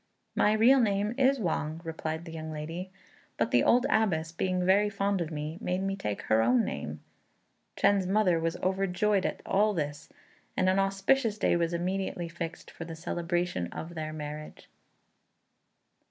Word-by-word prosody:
"My 210 - +3
real 240 +5 +6
name 205 -1 +1
is 270 +1 +3
Wang," 160 -4 -2
replied 160 0 -4
the 165 - -8
young 160 -1 -6
lady; 165 +5 -5 0.5
"but 115 0 0
the 120 - +4
old 245 +2 +4
Abbess, 165 -7 +1
being 180 +1 -1
very 200 +3 +4
fond 200 -2 0
of 165 - -2
me, 155 +2 -5
made 180 +1 -1
me 195 0 -1
take 105 - -4
her 110 +1 +3
own 120 +1 +3
name." 75 +1 -5 0.8
Chên's 200 -2 +3
mother 190 -4 +3
was 165 +1 -1
overjoyed 190 +1 +1
at - - -6
all 210 +1 +2
this, 145 -2 -4 0.5
and 185 - +2
an 190 +1 +3
auspicious 205 +4 +2
day - - +2
was 170 -1 +1
immediately 180 0 -2
fixed 170 -1 -6
for - - -8
the 165 -1 -7
celebration 175 - -2
of 165 - -7
their 155 -2 -4
marriage. 150 0 -8
175 Hz, 165 wpm, -29 LUFS, 160-195 Hz, 0.8 s, real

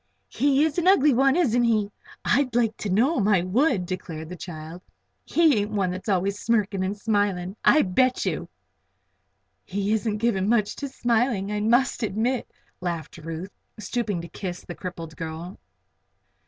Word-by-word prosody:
"He 280 +1 +2
is 315 +2 -1
an 350 - 0
ugly 300 -7 +6
one; 270 +3 +4
isn't 245 -9 +2
he? 215 -3 +1 0.3
I'd 255 -1 +2
like 225 -3 +2
to 210 - -4
know 245 - +2
him, 200 - +1
I 190 -5 +3
would," 210 - +1
declared 165 -4 -6
the - - -6
odd 180 - -10
child. 165 0 -8 0.4
"He 315 -8 +4
ain't 205 +1 -1
one 195 -4 0
that's 185 +4 -6
always 200 +1 0
smirking 210 -4 0
and 195 +2 -2
smiling, 205 -4 0
I 305 - +6
bet 255 +7 +1
you!" - - -2 1.1
"He 200 +2 -1
isn't 220 -1 0
given 210 -3 +1
much 215 -3 +2
to 285 - -4
smiling, 235 -5 0
I 210 - -1
must 240 +6 +2
admit," 225 +4 -1 0.3
laughed 170 -2 -4
Ruth, 165 +4 -6 0.3
stooping 215 -3 -2
to 170 - -8
kiss 180 +1 -6
the 175 - -6
crippled 165 -3 -7
girl. 165 +3 -7
205 Hz, 165 wpm, -25 LUFS, 185-240 Hz, 1.1 s, ugly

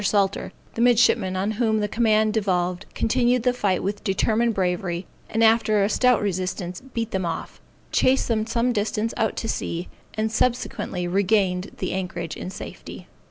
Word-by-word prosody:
Salter, 200 -1 +1 0.2
the 230 - -2
midshipman 230 -6 +4
on 195 +3 0
whom 220 -2 +2
the 210 - 0
command 215 -1 +2
devolved, 180 -4 0
continued 245 +1 +2
the 250 0 +3
fight 200 -7 0
with 200 +2 -3
determined 225 +3 +1
bravery, 180 -1 -1 0.2
and 225 +1 +1
after 220 -2 +4
a 200 - +2
stout 250 -1 +3
resistance, 185 -2 -3
beat 230 -4 -4
them 190 -1 -1
off, 165 -1 -5 0.3
chased 260 +1 +3
them 220 -2 0
some 235 +2 +1
distance 215 +1 -1
out 220 - 0
to 225 - -3
sea, 175 -5 -3 0.3
and 220 0 -1
subsequently 230 -7 -1
regained 190 0 +1
the 185 - -2
anchorage 175 -3 -4
in - - -6
safety. 195 - -9
210 Hz, 160 wpm, -24 LUFS, 185-230 Hz, 0.3 s, midshipman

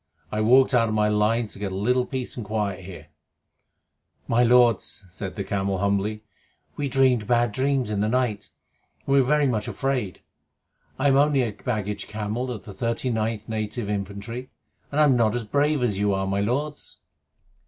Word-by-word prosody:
I 105 - -1
walked 130 +5 +5
out 115 -2 +4
of 110 - -1
my 105 0 +2
lines 105 +1 +1
to - - -10
get 100 -2 -3
a - - -4
little 125 +6 +1
peace 130 -3 -4
and 120 - -5
quiet 100 -3 -3
here." 95 -2 -10 1.2
"My 115 +1 +3
lords," 120 -4 +3
said 95 0 -6
the 100 - -3
camel 95 0 -1
humbly, 100 +2 -1 0.5
"we 145 - -2
dreamed 125 -4 +2
bad 120 -1 +2
dreams 130 -1 0
in 105 - -1
the 105 - +1
night, 120 -4 -1 0.6
and 135 - 0
we 140 - +6
were 125 - -1
very 150 +1 +3
much 115 -6 0
afraid. 130 - -2 0.8
I 135 - +2
am 135 - +4
only 145 -2 +3
a 115 - -2
baggage 105 -2 -3
camel 110 +4 -3
of 115 -5 -6
the 100 - -9
39th 115 0 -2
Native 110 0 -3
Infantry, 100 +5 -5 0.4
and 145 - 0
I - - +7
am 140 -4 +5
not 115 -2 +2
as 120 - -2
brave 145 +4 +1
as 105 -5 0
you 100 -1 +2
are, 95 0 -1
my 100 +1 -1
lords." 140 +8 -3
115 Hz, 185 wpm, -24 LUFS, 105-125 Hz, 1.2 s, I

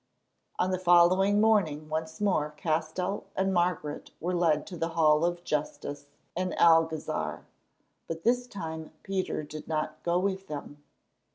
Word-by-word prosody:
On 185 +1 +1
the 185 - 0
following 185 +3 +5
morning 185 -9 +2
once 160 +1 -4
more 185 -7 +1
Castell 165 +5 -1
and 190 0 +1
Margaret 175 -4 -1
were 180 +2 -2
led 165 -4 +2
to 180 - -8
the 165 0 -2
Hall 155 -1 +5
of 175 0 -1
Justice 145 -2 -3 0.3
in 185 +1 -1
the - - -5
Alcazar; 165 -2 +2 0.6
but 165 0 -5
this 245 +1 +2
time 160 -7 -6
Peter 190 -5 -2
did 150 +1 -9
not 155 -1 -2
go 175 0 +1
with 195 +1 -1
them. 145 -1 -7
170 Hz, 150 wpm, -29 LUFS, 155-185 Hz, 0.6 s, following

